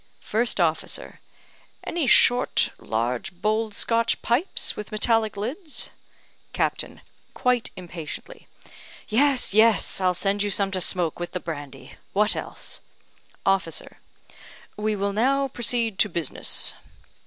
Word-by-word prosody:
First 230 Hz, 0 st, +1 dB
officer: 160 Hz, -2 st, -1 dB, 0.6 s
"Any 330 Hz, -5 st, -1 dB
short, 245 Hz, +1 st, +4 dB
large 115 Hz, +2 st, -2 dB
bowled, 215 Hz, +3 st, -1 dB
Scotch 230 Hz, 0 st, +2 dB
pipes, 265 Hz, +11 st, 0 dB
with 210 Hz, +1 st, -7 dB
metallic 220 Hz, -1 st, +2 dB
lids?" 280 Hz, -, -4 dB, 0.6 s
Captain -, -, -1 dB, 0.3 s
(quite 250 Hz, -2 st, +1 dB
impatiently): 175 Hz, -, -8 dB, 0.6 s
"Yes, 260 Hz, 0 st, +3 dB
yes; 220 Hz, -2 st, +4 dB
I'll 180 Hz, -1 st, +2 dB
send 200 Hz, +3 st, 0 dB
you 205 Hz, -, 0 dB
some 195 Hz, 0 st, 0 dB
to 185 Hz, -1 st, -1 dB
smoke, 175 Hz, -3 st, +1 dB
with 175 Hz, -, -5 dB
the 180 Hz, -, -2 dB
brandy. 145 Hz, -5 st, -8 dB, 0.2 s
What 210 Hz, +2 st, +3 dB
else?" -, -, -5 dB, 0.6 s
Officer: 195 Hz, -5 st, -1 dB, 0.8 s
"We 215 Hz, 0 st, -1 dB
will 200 Hz, 0 st, -1 dB
now 270 Hz, +5 st, +2 dB
proceed 235 Hz, -4 st, +1 dB
to 210 Hz, -, +4 dB
business." 170 Hz, -5 st, +1 dB
210 Hz, 120 wpm, -25 LUFS, 180-235 Hz, 0.8 s, short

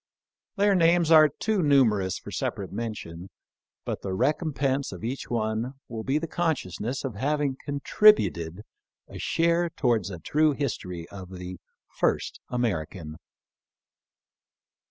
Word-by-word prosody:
Their 205 Hz, 0 st, +3 dB
names 170 Hz, -2 st, +4 dB
are 155 Hz, -1 st, +8 dB
too 210 Hz, +7 st, -1 dB
numerous 115 Hz, -, +3 dB
for -, -, -10 dB
separate 100 Hz, -2 st, -3 dB
mention, 100 Hz, -5 st, -6 dB, 0.6 s
but -, -, -3 dB
the 95 Hz, -, -3 dB
recompense 140 Hz, -, 0 dB
of 90 Hz, -3 st, -9 dB
each 125 Hz, +4 st, -4 dB
one 115 Hz, +2 st, -1 dB
will 115 Hz, -2 st, -6 dB
be 135 Hz, +4 st, +1 dB
the 160 Hz, -, -2 dB
consciousness 135 Hz, -, -2 dB
of 135 Hz, -4 st, -3 dB
having 140 Hz, +4 st, 0 dB
contributed 105 Hz, -, +3 dB, 0.4 s
a -, -, -9 dB
share 170 Hz, +1 st, +1 dB
towards 120 Hz, -, 0 dB
a 90 Hz, -, -6 dB
true 150 Hz, -, +2 dB
history 90 Hz, -, -4 dB
of 95 Hz, -2 st, -9 dB
the 90 Hz, -1 st, -8 dB, 0.2 s
" -, -, -67 dB
first -, -, 0 dB
Ameri 115 Hz, -11 st, 0 dB
can." 80 Hz, -4 st, -9 dB
125 Hz, 135 wpm, -26 LUFS, 95-150 Hz, 0.6 s, are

